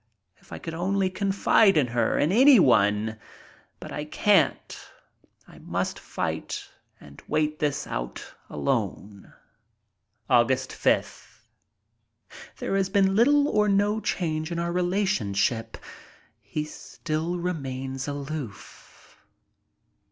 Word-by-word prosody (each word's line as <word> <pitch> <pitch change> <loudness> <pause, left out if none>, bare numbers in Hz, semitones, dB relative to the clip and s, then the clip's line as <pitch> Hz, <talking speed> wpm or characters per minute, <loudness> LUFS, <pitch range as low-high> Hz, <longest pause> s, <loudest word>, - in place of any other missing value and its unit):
If - - -24
I - - -6
could 165 - -7
only 190 +3 0
confide 195 0 +3
in 145 - +4
her! 120 -1 0
In 150 - +2
anyone! 110 - +4 0.6
But - - -9
I 150 - -4
can't. 180 +1 +1 0.7
I - - -15
must - - -3
fight - - -4 0.3
and 70 0 -14
wait 155 0 0
this 145 -2 -1
out - - -6 0.2
alone. 105 -5 -3 1.0
Aug. 120 0 +4
5th. 130 0 -1 1.2
There - - -2
has 195 -1 0
been 195 0 +2
little 285 +6 +4
or 210 -5 +2
no 205 +2 +2
change 160 -5 -2
in 170 - -3
our 170 0 -1
relationship. 170 - 0 0.6
He 105 +9 -4
still 160 +2 -4
remains 135 -6 -4
aloof. 140 -6 -8
155 Hz, 105 wpm, -26 LUFS, 125-195 Hz, 1.2 s, in